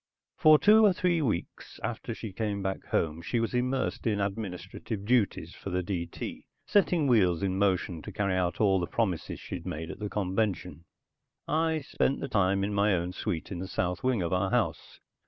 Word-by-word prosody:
For 155 Hz, -1 st, +7 dB
two 215 Hz, +6 st, +6 dB
or 205 Hz, -3 st, +6 dB
three 175 Hz, -2 st, +1 dB
weeks 110 Hz, -, -3 dB
after -, -, -4 dB
she 105 Hz, -4 st, -7 dB
came 100 Hz, -1 st, -2 dB
back 95 Hz, 0 st, -3 dB
home, 80 Hz, 0 st, 0 dB
she 115 Hz, +7 st, -1 dB
was 115 Hz, +1 st, -1 dB
immersed 125 Hz, 0 st, -1 dB
in 105 Hz, -2 st, +1 dB
administrative 100 Hz, 0 st, -4 dB
duties 120 Hz, -2 st, +1 dB
for -, -, -7 dB
the 90 Hz, 0 st, -1 dB
D.T., 85 Hz, -2 st, -5 dB, 0.2 s
setting 180 Hz, -6 st, +3 dB
wheels 100 Hz, -9 st, +3 dB
in 95 Hz, -1 st, 0 dB
motion 95 Hz, -4 st, +1 dB
to -, -, -8 dB
carry 100 Hz, -2 st, 0 dB
out 90 Hz, -2 st, 0 dB
all 95 Hz, -3 st, +4 dB
the 85 Hz, -, -2 dB
promises 95 Hz, -8 st, -1 dB
she'd -, -, -7 dB
made 80 Hz, +2 st, -4 dB
at -, -, -10 dB
the 105 Hz, -1 st, -3 dB
convention. 95 Hz, -5 st, -2 dB, 0.6 s
I 160 Hz, 0 st, +1 dB
spent 135 Hz, 0 st, 0 dB
the -, -, -3 dB
time 100 Hz, -3 st, +2 dB
in 105 Hz, +1 st, -1 dB
my 100 Hz, 0 st, +3 dB
own 85 Hz, +1 st, -2 dB
suite 90 Hz, -4 st, -3 dB
in 90 Hz, -, -4 dB
the 95 Hz, -, -4 dB
south 90 Hz, -1 st, -2 dB
wing 125 Hz, -7 st, +1 dB
of 85 Hz, -, -1 dB
our 95 Hz, +1 st, +1 dB
house. -, -, -1 dB
100 Hz, 190 wpm, -29 LUFS, 90-120 Hz, 0.6 s, For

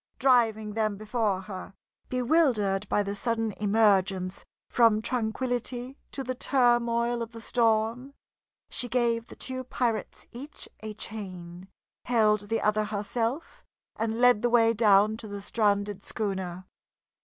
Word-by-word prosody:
Driving 225 Hz, -5 st, +3 dB
them 215 Hz, -2 st, 0 dB
before 210 Hz, -2 st, -1 dB
her, 190 Hz, -1 st, -8 dB, 0.3 s
bewildered 235 Hz, -7 st, +1 dB
by 205 Hz, -, +2 dB
the 200 Hz, 0 st, -3 dB
sudden 225 Hz, 0 st, -1 dB
emergence 195 Hz, -3 st, +2 dB, 0.2 s
from 230 Hz, -3 st, +4 dB
tranquillity 245 Hz, +2 st, -2 dB, 0.2 s
to 270 Hz, -, -5 dB
the 255 Hz, 0 st, -3 dB
turmoil 240 Hz, -2 st, +2 dB
of 230 Hz, 0 st, -5 dB
the 230 Hz, -, -8 dB
storm, 230 Hz, +3 st, 0 dB, 0.6 s
she 245 Hz, -, -2 dB
gave 235 Hz, -1 st, +1 dB
the -, -, -11 dB
two 260 Hz, 0 st, -3 dB
pirates 240 Hz, -3 st, -2 dB
each 275 Hz, +5 st, -8 dB
a 215 Hz, -1 st, -7 dB
chain, 185 Hz, -5 st, -7 dB, 0.4 s
held 215 Hz, -4 st, +2 dB
the 225 Hz, -, 0 dB
other 215 Hz, 0 st, +2 dB
herself, 225 Hz, +7 st, -3 dB, 0.3 s
and 225 Hz, +1 st, -2 dB
led 245 Hz, -3 st, +5 dB
the 240 Hz, -, +2 dB
way 230 Hz, -1 st, +4 dB
down 210 Hz, -1 st, +4 dB
to 225 Hz, -, -9 dB
the 205 Hz, -1 st, -6 dB
stranded 205 Hz, -1 st, 0 dB
schooner. 190 Hz, -4 st, -4 dB
225 Hz, 130 wpm, -28 LUFS, 205-240 Hz, 0.6 s, led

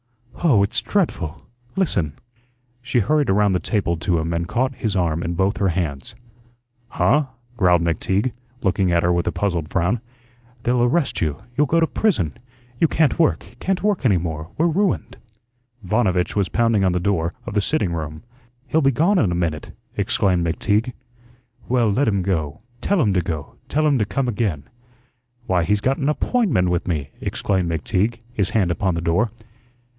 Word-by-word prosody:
Oh, 125 Hz, -12 st, +5 dB
it's 100 Hz, -, 0 dB
dreadful! 90 Hz, -, -2 dB, 0.3 s
Listen." 95 Hz, -, 0 dB, 0.7 s
She 125 Hz, 0 st, -2 dB
hurried 145 Hz, +6 st, +2 dB
around 100 Hz, +1 st, +3 dB
the 90 Hz, -, +1 dB
table 90 Hz, -5 st, -1 dB
to 85 Hz, +2 st, 0 dB
him 80 Hz, +1 st, -1 dB
and 85 Hz, +1 st, -2 dB
caught 130 Hz, +6 st, 0 dB
his 110 Hz, -5 st, -2 dB
arm 85 Hz, -3 st, 0 dB
in 85 Hz, +1 st, -2 dB
both 95 Hz, +4 st, +1 dB
her 100 Hz, -, +1 dB
hands. 80 Hz, -7 st, -3 dB, 0.7 s
"Huh?" 150 Hz, +5 st, +2 dB, 0.3 s
growled 90 Hz, -6 st, +3 dB
McTeague, 95 Hz, +8 st, 0 dB, 0.3 s
looking 95 Hz, -2 st, +2 dB
at 85 Hz, -1 st, +2 dB
her 90 Hz, +1 st, +3 dB
with 85 Hz, -1 st, 0 dB
a -, -, +2 dB
puzzled 85 Hz, -6 st, -1 dB
frown. 95 Hz, +6 st, 0 dB, 0.6 s
"They'll 120 Hz, 0 st, +2 dB
arrest 135 Hz, +6 st, +1 dB
you. 75 Hz, -3 st, 0 dB, 0.2 s
You'll 150 Hz, +2 st, +3 dB
go 165 Hz, +5 st, +3 dB
to 165 Hz, -, +4 dB
prison. 135 Hz, -, 0 dB, 0.5 s
You 165 Hz, -, +5 dB
can't 155 Hz, 0 st, +1 dB
work 165 Hz, -, +2 dB
can't 190 Hz, 0 st, -1 dB
work 205 Hz, -6 st, +1 dB
any 105 Hz, -8 st, +4 dB
more. 80 Hz, -1 st, -4 dB
We're 160 Hz, -, +2 dB
ruined." 190 Hz, +3 st, 0 dB, 0.7 s
Vanovitch 95 Hz, -3 st, +1 dB
was 100 Hz, -3 st, +1 dB
pounding 115 Hz, -3 st, +2 dB
on 95 Hz, -2 st, +2 dB
the 90 Hz, -, +1 dB
door 85 Hz, -3 st, 0 dB
of -, -, -5 dB
the 105 Hz, -, +2 dB
sitting 100 Hz, -, 0 dB
room. 80 Hz, 0 st, -5 dB, 0.4 s
"He'll 155 Hz, +5 st, +1 dB
be 135 Hz, -, +4 dB
gone 170 Hz, -, +3 dB
in 95 Hz, -, +2 dB
a -, -, 0 dB
minute," 80 Hz, -3 st, -2 dB, 0.3 s
exclaimed 90 Hz, -3 st, +1 dB
McTeague. 105 Hz, +8 st, 0 dB, 0.8 s
"Well, 120 Hz, -4 st, +3 dB
let 135 Hz, +8 st, +1 dB
him 100 Hz, -3 st, +1 dB
go. 80 Hz, -7 st, -2 dB, 0.2 s
Tell 200 Hz, -1 st, +1 dB
him 105 Hz, -10 st, +3 dB
to 90 Hz, -, +2 dB
go; 80 Hz, -4 st, -5 dB
tell 155 Hz, +2 st, +1 dB
him 145 Hz, -4 st, +3 dB
to 105 Hz, -, +2 dB
come 135 Hz, +5 st, -1 dB
again." 100 Hz, -, -1 dB, 0.8 s
"Why, 90 Hz, -7 st, +1 dB
he's 105 Hz, +5 st, +1 dB
got 135 Hz, +1 st, +1 dB
an 140 Hz, 0 st, +1 dB
APPOINTMENT 150 Hz, -, +1 dB
with 90 Hz, 0 st, -1 dB
me," 75 Hz, -6 st, -2 dB
exclaimed 95 Hz, -3 st, -1 dB
McTeague, 95 Hz, +8 st, -1 dB
his 100 Hz, -6 st, 0 dB
hand 95 Hz, -6 st, +1 dB
upon 90 Hz, +1 st, 0 dB
the 85 Hz, -, -2 dB
door. 85 Hz, +7 st, +1 dB
100 Hz, 180 wpm, -21 LUFS, 85-125 Hz, 0.8 s, Oh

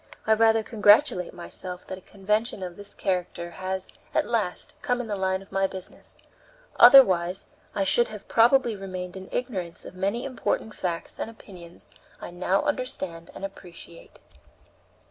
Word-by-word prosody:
I 220 Hz, -, +4 dB
rather 225 Hz, 0 st, +4 dB
congratulate 210 Hz, -3 st, +4 dB
myself 180 Hz, +1 st, -4 dB
that 185 Hz, -, -6 dB
a -, -, -21 dB
convention 210 Hz, +2 st, -2 dB
of 180 Hz, -1 st, -6 dB
this 205 Hz, +1 st, -3 dB
character 180 Hz, -2 st, -3 dB
has, 190 Hz, +1 st, -1 dB, 0.3 s
at -, -, +2 dB
last, 215 Hz, -6 st, -2 dB
come 245 Hz, 0 st, 0 dB
in 245 Hz, -, -3 dB
the 210 Hz, -2 st, -3 dB
line 190 Hz, 0 st, -1 dB
of 195 Hz, -, -23 dB
my 195 Hz, 0 st, +1 dB
business; 190 Hz, -1 st, -7 dB, 0.6 s
otherwise 185 Hz, -9 st, +7 dB, 0.3 s
I 200 Hz, -, +1 dB
should 235 Hz, +5 st, +4 dB
have 210 Hz, -2 st, -10 dB
probably 235 Hz, 0 st, +4 dB
remained 185 Hz, -2 st, -6 dB
in 190 Hz, 0 st, -9 dB
ignorance 185 Hz, -9 st, -4 dB
of -, -, -9 dB
many 200 Hz, +7 st, -2 dB
important 250 Hz, -4 st, -2 dB
facts 170 Hz, -2 st, -4 dB
and -, -, -3 dB
opinions 180 Hz, -6 st, -11 dB, 0.3 s
I -, -, -8 dB
now 180 Hz, +2 st, 0 dB
understand 190 Hz, -, -3 dB
and 195 Hz, -, -5 dB
appreciate." 175 Hz, -3 st, -12 dB
195 Hz, 155 wpm, -26 LUFS, 180-220 Hz, 0.6 s, otherwise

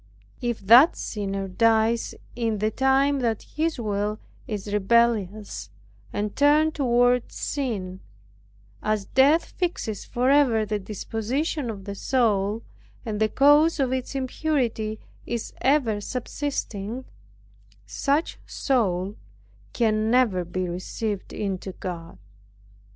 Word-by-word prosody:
If 240 Hz, -2 st, -2 dB
that 240 Hz, -, +7 dB
sinner 195 Hz, -2 st, -3 dB
dies 225 Hz, +3 st, +2 dB, 0.2 s
in 225 Hz, -2 st, -1 dB
the 215 Hz, +2 st, 0 dB
time 270 Hz, +3 st, +2 dB
that 230 Hz, -4 st, -1 dB
his 315 Hz, -2 st, -2 dB
will 210 Hz, -1 st, -1 dB, 0.3 s
is 205 Hz, -1 st, -4 dB
rebellious 210 Hz, -, +1 dB, 0.4 s
and 205 Hz, 0 st, -3 dB
turned 300 Hz, +2 st, +4 dB
toward 245 Hz, -3 st, +2 dB
sin, 205 Hz, -10 st, -3 dB, 0.8 s
as 215 Hz, -2 st, -1 dB
death 280 Hz, +9 st, +3 dB
fixes 335 Hz, -, -2 dB
forever 250 Hz, -3 st, +3 dB
the 210 Hz, 0 st, -2 dB
disposition 230 Hz, -, -3 dB
of 200 Hz, -3 st, -7 dB
the 200 Hz, -, -4 dB
soul, 210 Hz, -2 st, +1 dB, 0.4 s
and 215 Hz, -2 st, -3 dB
the 215 Hz, 0 st, +2 dB
cause 295 Hz, +6 st, +5 dB
of 260 Hz, -2 st, +1 dB
its 260 Hz, +1 st, -3 dB
impurity 255 Hz, -5 st, -1 dB, 0.3 s
is 235 Hz, -1 st, -4 dB
ever 255 Hz, -7 st, +2 dB
subsisting, 250 Hz, -2 st, -4 dB, 0.8 s
such 290 Hz, +3 st, -1 dB
soul 200 Hz, -7 st, 0 dB, 0.5 s
can 220 Hz, -2 st, +1 dB
never 230 Hz, -7 st, +3 dB
be 180 Hz, +1 st, -3 dB
received 190 Hz, +3 st, -4 dB
into 190 Hz, -2 st, -4 dB
God. 170 Hz, -, -7 dB
225 Hz, 110 wpm, -25 LUFS, 205-265 Hz, 0.8 s, that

